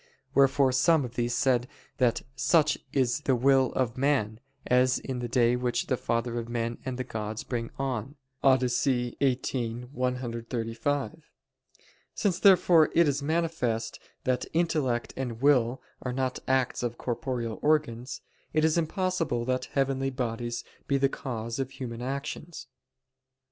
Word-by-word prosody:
Wherefore 135 -1 +4
some 140 +3 +3
of 120 - -8
these 120 0 -1
said 125 -2 +2 0.3
that 120 -2 +2
"such 150 +3 +3 0.2
is 130 -1 +1
the 135 -3 +2
will 130 +1 +4
of 125 -1 -1
men, 130 -6 +1 0.3
as 125 +1 +3
is 130 -2 -4
the 120 - -3
day 120 0 +3
which 125 -1 -1
the 130 - +1
father 120 0 -1
of 115 0 -6
men 115 0 -2
and 130 -1 -4
of 130 - -3
gods 110 -1 -4
brings 115 -2 -3
on" 135 0 -3 0.3
(Odyssey 125 -1 +2
xviii 125 -3 0
135). 125 +3 -3 0.9
Since, 190 -4 0
therefore, 180 -5 +6
it 170 -1 +5
is 140 0 0
manifest 155 -7 -1 0.2
that 125 -1 0
intellect 150 -8 0
and 125 -4 -4
will 130 -3 +3 0.2
are 125 - -3
not 130 0 -1
acts 130 -1 +1
of 120 -1 -3
corporeal 120 -3 -3
organs, 135 -5 0 0.3
it 155 0 +3
is 160 +1 +3
impossible 165 - -1
that 130 0 0
heavenly 135 -1 0
bodies 120 -2 -3 0.2
be 140 - +2
the 135 0 +3
cause 115 -3 -5
of 135 -1 -1
human 120 -3 -6
actions. 140 +5 -5
130 Hz, 145 wpm, -28 LUFS, 120-140 Hz, 0.9 s, therefore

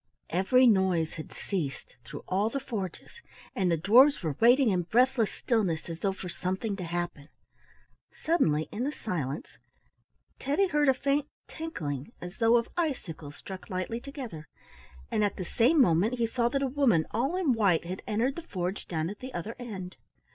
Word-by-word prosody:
Every 195 +9 +4
noise 190 -7 +3
has 155 - -6
ceased 165 -9 -4
through - - -9
all 200 +4 +1
the 275 - -2
forges, 225 - -6 0.3
and 185 -2 +1
the 170 - +2
dwarfs 240 - +5
were 155 -4 -1
waiting 245 0 +5
in 180 -2 +1
breathless 240 +4 +2
stillness 195 -9 -1
as 165 - -6
though 195 +2 +1
for 190 -1 -7
something 185 +5 -3
to 185 - -5
happen. 175 -3 -4 0.8
Suddenly, 160 - +1
in 225 - -3
the 285 - 0
silence, 155 - -4 0.8
Teddy 305 +8 +1
heard 295 -3 +3
a 265 - +4
faint 280 +2 0 0.2
tinkling 160 - -5
as 180 +4 -9
though 230 +1 +5
of 235 - 0
icicles 180 - -3
struck 190 -1 -9
lightly 185 +5 -3
together, 240 - -8 0.6
and 215 - +2
at 205 - 0
the 185 - -5
same 255 - +3
moment 205 +1 +4
he 235 -2 +1
saw 235 +1 0
that 275 +2 0
a - - +2
woman 250 - +3
all 260 +10 0
in 350 -8 +2
white 195 -8 +2
had 185 +2 -5
entered 235 +6 0
the 340 - -5
forge 190 - -4
down 160 -2 -2
at 205 +3 -7
the 260 +1 -7
other 210 +7 -4
end. 190 -7 -7
210 Hz, 175 wpm, -29 LUFS, 175-260 Hz, 0.8 s, dwarfs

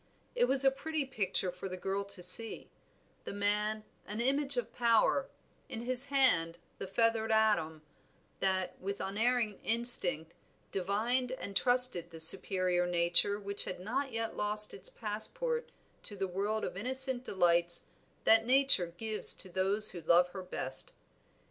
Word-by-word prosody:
It - - +2
was 275 - +2
a 270 - +5
pretty 310 +2 -4
picture 195 -7 -3
for 180 +2 -8
the 185 - -6
girl 195 +2 -3
to 200 -2 -2
see; 225 +5 +2 0.5
the - - -7
man, 210 +1 -1 0.2
an 210 +2 -5
image 275 +2 0
of 245 - -4
power, 235 +3 +1 0.4
in 230 -1 -6
his 255 +2 +2
hand 255 -13 +2 0.2
the 195 - -5
feathered 225 +2 0
atom, 170 -8 +1 0.6
that, 185 -2 -1
with 200 +2 -5
unerring 220 +1 -1
instinct, 185 -9 +2 0.4
divined 230 +7 -2
and 200 -6 -8
trusted 245 -8 +2
the 165 -1 -11
superior 180 +1 +4
nature 175 +4 +1
which 200 0 -2
had 185 - -6
not 260 +8 -3
yet 225 0 -4
lost 210 0 +1
its 195 - -7
passport 230 - -4 0.3
to 205 - +4
the 195 -1 -3
world 205 +4 -3
of - - -6
innocent 260 +4 0
delights 175 -4 +1 0.4
that 225 0 +6
Nature 260 -7 +2
gives 220 0 +2
to 190 - -12
those 195 +4 +3
who 175 - -8
love 175 +2 +3
her 190 +1 -8
best. 130 -7 -7
210 Hz, 150 wpm, -31 LUFS, 185-245 Hz, 0.6 s, that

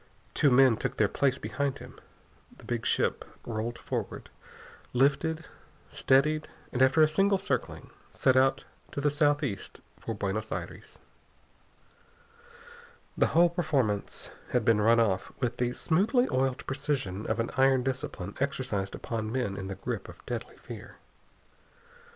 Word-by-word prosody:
Two 145 - +4
men 130 -3 +6
took - - -3
their 105 - +4
place 130 +4 +1
behind 140 -1 -2
him. - - -12 0.6
The - - -16
big 120 -2 -2
ship - - +1 0.2
rolled 115 +1 -3
forward, - - -5 0.6
lifted, 155 +5 +2 0.4
steadied, 150 +4 +2 0.3
and 125 - 0
after 130 +4 +6
a - - +6
single 195 +5 +2
circling 190 - -3 0.2
set 130 - +2
out 135 +1 +3 0.3
to - - -3
the 145 +1 +2
southeast 145 - 0 0.2
for 115 - -4
Buenos 105 +2 -3
Aires. - - -6 2.2
The - - +3
whole 170 +1 +4
performance 140 - -1 0.2
had 125 -3 +1
been 110 -2 +4
run 115 +2 +5
off 100 -5 +1
with 120 -2 -1
the 120 0 0
smoothly 215 - +2
oiled 130 0 0
precision 135 -8 -2
of 110 +1 -1
an 115 - -1
iron 135 -1 +4
discipline 125 -7 -3
exercised 130 -9 -2
upon 110 -2 -4
men 125 -6 -1
in 95 -1 -5
the 95 - -4
grip 95 - -5
of - - -14
deadly - - -5
fear. - - -10
130 Hz, 140 wpm, -29 LUFS, 110-145 Hz, 2.2 s, men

